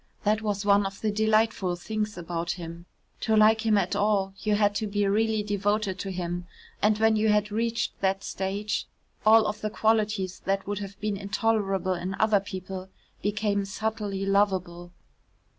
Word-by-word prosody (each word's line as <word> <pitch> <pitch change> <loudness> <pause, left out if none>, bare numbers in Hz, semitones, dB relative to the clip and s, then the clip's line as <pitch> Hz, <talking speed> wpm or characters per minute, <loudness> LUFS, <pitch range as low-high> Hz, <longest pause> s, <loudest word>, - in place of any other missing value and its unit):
That 215 +1 +2
was 205 -2 -2
one 200 -1 +4
of 195 0 -9
the 215 - +1
delightful 215 -3 +2
things 210 +3 -3
about 170 0 -3
him; 170 0 -9 0.3
to 220 - +1
like 220 +1 +5
him 215 -1 +4
at 190 -2 0
all 200 -2 +1
you 210 -1 +1
had 205 -1 +3
to 215 - -2
be 205 0 0
really 215 +2 +1
devoted 205 -1 -1
to 195 - -4
him 175 -1 -4 0.3
and 210 0 +3
when 220 0 +4
you 215 0 +2
had 210 0 +2
reached 230 +2 -1
that 195 0 +1
stage, 200 +2 -2 0.4
all 220 0 +7
of 210 0 -3
the 215 - -1
qualities 210 -4 0
that 195 0 0
would 205 0 -3
have 200 0 -8
been 210 -1 -1
intolerable 200 -2 0
in 185 +2 -4
other 215 -2 +4
people 190 -1 -7 0.3
became 205 -1 0
subtly 205 -1 -3
lovable. 185 -3 0
205 Hz, 170 wpm, -27 LUFS, 190-215 Hz, 0.4 s, all